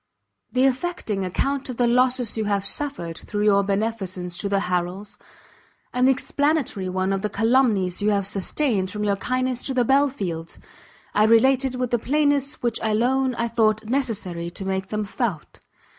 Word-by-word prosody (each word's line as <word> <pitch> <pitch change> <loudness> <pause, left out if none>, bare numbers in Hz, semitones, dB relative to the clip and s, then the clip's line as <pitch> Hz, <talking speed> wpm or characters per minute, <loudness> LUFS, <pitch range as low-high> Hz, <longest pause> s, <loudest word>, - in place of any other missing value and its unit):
The 255 +1 +3
affecting 260 - -1
account 275 +9 -1
of 250 - -5
the 245 - +3
losses 250 -1 +2
you 220 -1 -1
have 200 -1 0
suffered 200 - -2
through 210 0 -3
your 200 -1 +4
beneficence 195 -3 -2
to 200 - -2
the 200 -1 +1
Harrels, 180 +2 -3 0.7
and 250 +1 +3
the - - +6
explanatory 275 -7 0
one 185 +1 0
of 195 - -1
the 210 - -1
calumnies 220 -4 +2
you 210 - +2
have 200 -2 +1
sustained 200 +1 0
from 210 +2 -4
your 200 -1 +1
kindness 255 +3 -1
to 265 - -2
the 245 -2 +3
Belfields, 225 - 0 0.6
I 210 - +4
related 260 +3 +4
with 250 -1 -2
the 240 - +2
plainness 285 +1 0
which 235 -2 0
alone 250 +4 +1
I 235 0 -1
thought 220 -2 +1
necessary 215 -9 -2
to 190 +3 -6
make 190 0 -2
them 210 0 -2
felt. 200 -6 -4
220 Hz, 170 wpm, -23 LUFS, 195-255 Hz, 0.7 s, the